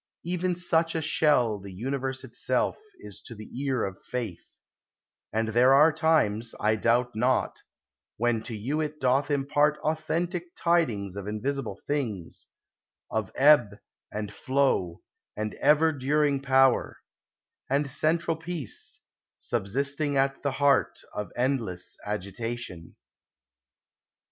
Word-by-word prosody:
Even 180 +1 -1
such 165 -2 +1
a - - +1
shell 145 -8 +2
the 100 0 -10
universe 130 +6 -3
itself - - -1 0.2
Is - - -7
to 115 - -9
the 110 0 -10 0.2
ear 130 -4 0
of 95 -1 -5
Faith; 115 -8 -6 0.7
and 110 +1 0
there 125 +4 +5
are 150 +3 +6
times, 150 -9 +1
I 110 +1 +2
doubt 120 +2 +1
not, 125 +4 +1 0.6
when 120 0 +1
to 115 - -4
you 140 +9 -1
it 150 0 -4
doth 130 +3 +2
impart 145 +1 +2
Authentic 170 +3 -2
tidings 120 - +1
of 100 0 -6
invisible 110 0 -3
things; 115 - -3 0.6
Of 110 -4 -2
ebb 130 -8 +5 0.4
and 105 -1 -4
flow, 130 -11 0 0.3
and 105 0 -2
ever 155 +2 +5
during 145 0 +1
power; 135 -1 +3 0.7
And 140 +2 +1
central 160 +4 +1
peace, 165 - -5 0.4
subsisting 140 +7 -1
at 135 0 +1
the 140 -2 -1
heart 140 +1 +2 0.2
Of 105 - -4
endless 120 -9 -1
agitation. 105 -2 -5
135 Hz, 120 wpm, -27 LUFS, 110-150 Hz, 0.7 s, are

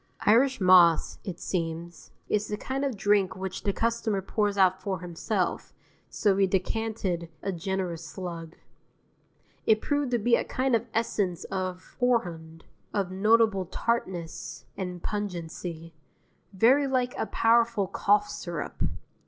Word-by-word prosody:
Irish 260 +5 +4
Moss, 180 -3 +5
it 180 -4 -6
seems, 170 -1 -4 0.2
is 210 0 0
the 210 - -3
kind 265 +5 -3
of 270 -6 -1
drink 200 -2 +2
which 190 0 -5
the 200 - 0
customer 230 -1 0
pours 205 +1 -1
out 190 -1 +4
for 190 -3 -2
himself, 180 +3 -2 0.4
so 205 -2 +2
we 195 0 +3
decanted 190 -3 -1
a 195 - -1
generous 180 -1 -3
slug. 170 -3 -7 1.1
It 220 -1 +5
proved 290 +2 0
to 245 - +2
be 235 +2 +3
a - - 0
kind 260 -1 0
of 230 +1 -1
essence 205 -6 -1
of 185 -1 -4
horehound, 170 -10 -1 0.3
of 195 -3 -1
notable 210 -1 +3
tartness 185 -6 -3
and 180 -2 -5
pungency, 170 -4 -5 0.6
very 250 +9 +4
like 255 -2 0
a - - -2
powerful 230 -2 +3
cough 205 +2 +2
syrup. 170 -3 -6
195 Hz, 135 wpm, -27 LUFS, 180-225 Hz, 1.1 s, Moss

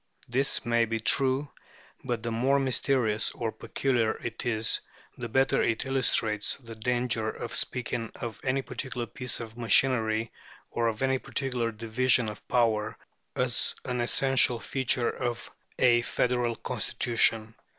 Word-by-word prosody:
This 130 +3 0
may 120 0 +3
be 115 0 -2
true, 135 +5 +1 0.5
but 120 -2 -3
the 120 - -2
more 130 +5 +2
mysterious 125 -5 +1
or 115 -2 -3
peculiar 120 -4 0
it 120 +1 -4
is 110 -1 +3 0.4
the 120 -1 -6
better 135 +3 +2
it 115 +2 0
illustrates 115 -5 +1
the 115 -4 -11
danger 120 0 -1
of 120 +1 -6
speaking 120 -2 -1
of 115 -2 -7
any 135 +1 0
particular 130 -3 -4
piece 125 +3 -2
of 115 0 -9
machinery 115 -2 +2 0.4
or 120 0 0
of 115 +2 -2
any 135 0 +1
particular 125 -5 -1
division 115 +1 +1
of 105 - -11
power 110 -3 +1 0.4
as - - +3
an 125 -1 -2
essential 130 0 +3
feature 125 -1 0
of 120 -2 -4 0.3
a 120 -2 +4
federal 120 -1 0
constitution. 115 -2 +1
120 Hz, 140 wpm, -28 LUFS, 115-130 Hz, 0.5 s, a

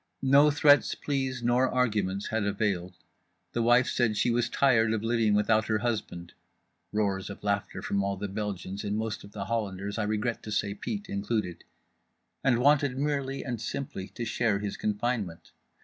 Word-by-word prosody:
No 140 +3 +6
threats, 145 0 +4
pleas 130 -3 -2
nor 125 +2 +3
arguments 105 -6 0
had 110 -1 0
availed. 100 -3 -1 0.6
The 120 - -1
wife 120 +2 +5
said 110 -3 +1
she 120 - +2
was 120 0 +1
tired 115 -5 +3
of 110 -1 -2
living 115 -2 +2
without 110 +1 +2
her 110 - +2
husband—roars 105 -1 -4
of 100 - -9
laughter 100 -1 -2
from 100 0 0
all 100 0 -1
the 100 +2 -3
Belgians 100 -1 -4
and 105 +1 -1
most 110 0 -3
of 100 - -12
the 100 -2 -4
Hollanders, 100 -2 -3
I - - +1
regret 110 +2 -1
to 105 - -8
say 100 -1 0
Pete 105 0 -5
included—and 105 +5 -4
wanted 140 0 +3
merely 140 -1 -1
and 120 -5 -4
simply 115 -5 -4
to 120 - -3
share 115 -2 +1
his 100 0 -4
confinement. 105 -5 -2
110 Hz, 165 wpm, -28 LUFS, 100-120 Hz, 0.6 s, No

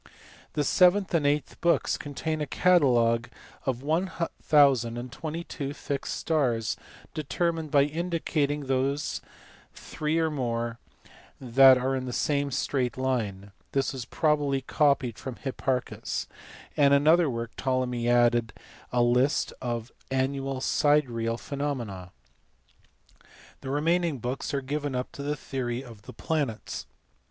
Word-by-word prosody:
The 150 - +1
seventh 185 +6 +4
and 155 -4 +3
eighth 145 -2 -1
books 170 0 +2
contain 155 +2 -4
a 150 - -2
catalogue 120 -10 +3 0.4
of 130 -1 -1
1022 145 -3 0
fixed 140 -1 -3
stars 125 -9 0 0.4
determined 160 +1 -1
by 140 -1 +5
indicating 155 -2 -1
those, 135 +2 -1 0.5
three 155 +1 -2
or 160 -1 +1
more, 120 -4 -2 0.6
that 130 +1 +7
are 130 +1 0
in 130 -1 -3
the 125 - -4
same 140 +1 0
straight 130 -2 -1
line 105 -7 -2 0.2
(this 135 +1 +1
was 130 -3 -5
probably 145 -2 +1
copied 135 -4 +1
from 130 -3 -6
Hipparchus): 130 -1 -2 0.5
and 140 -1 +5
in - - +5
another 165 +1 +5
work 115 -1 -4
Ptolemy 125 -2 -1
added 120 -1 +3 0.4
a 120 -1 +3
list 125 +4 +2
of 120 -1 -3 0.2
annual 135 0 -1
sidereal 125 -7 +2
phenomena. 120 - -4 1.5
The 130 - -7
remaining 165 +2 +1
books 125 +3 -3
are 140 - -1
given 145 0 -3
up 125 0 -3
to - - -8
the 145 +1 -1
theory 130 -2 -4
of 115 -3 -14
the - - -8
planets. 145 -9 -3
135 Hz, 125 wpm, -27 LUFS, 120-150 Hz, 1.5 s, that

